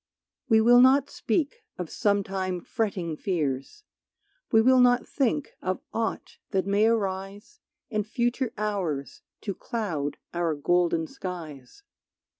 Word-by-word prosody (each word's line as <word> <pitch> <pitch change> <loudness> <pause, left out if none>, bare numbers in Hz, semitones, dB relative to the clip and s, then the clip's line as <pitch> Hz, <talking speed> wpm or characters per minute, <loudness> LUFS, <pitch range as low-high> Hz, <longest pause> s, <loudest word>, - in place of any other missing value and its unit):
We 220 -1 +6
will 245 +2 +7
not 270 +2 +5
speak 300 - -1
of 180 -3 -5
sometime 195 -3 0
fretting 185 -8 -2
fears, 150 - -2 0.7
We 225 - +6
will 255 +3 +5
not 245 0 +4
think 275 +1 0
of 185 0 -1
aught 225 0 -3
that 190 -3 0
may 200 +2 +3
arise 200 - -2 0.3
In 215 -1 +1
future 240 +2 -1
hours 190 -10 -2 0.2
to 200 - -3
cloud 170 -12 -3 0.2
our 170 -2 0
golden 170 +2 +1
skies. 160 - -8
200 Hz, 120 wpm, -27 LUFS, 175-235 Hz, 0.7 s, will